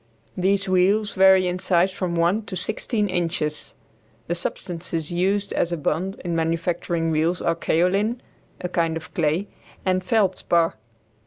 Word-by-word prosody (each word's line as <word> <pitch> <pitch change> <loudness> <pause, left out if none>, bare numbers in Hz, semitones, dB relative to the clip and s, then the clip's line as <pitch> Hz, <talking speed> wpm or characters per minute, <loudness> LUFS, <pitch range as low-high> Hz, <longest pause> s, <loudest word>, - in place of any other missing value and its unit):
These 195 +2 +1
wheels 195 +3 +3
vary 190 -1 +5
in 180 +1 -2
size 185 0 +2
from 185 -2 -3
one 170 +6 +2
to 185 - -5
sixteen 210 +3 -1
inches. 165 -4 -2 0.5
The 170 - -1
substances 170 -1 -4
used 195 +3 0
as 175 - 0
a 170 - -1
bond 175 +6 -2
in 170 -1 -1
manufacturing 165 0 -1
wheels 160 +3 +1
are 170 - +1
kaolin, 195 +8 +1 0.4
a 180 - -3
kind 165 -2 0
of 160 - -10
clay, 165 +2 0 0.4
and 185 -1 +1
feldspar. 185 -5 +2
180 Hz, 145 wpm, -23 LUFS, 165-190 Hz, 0.5 s, vary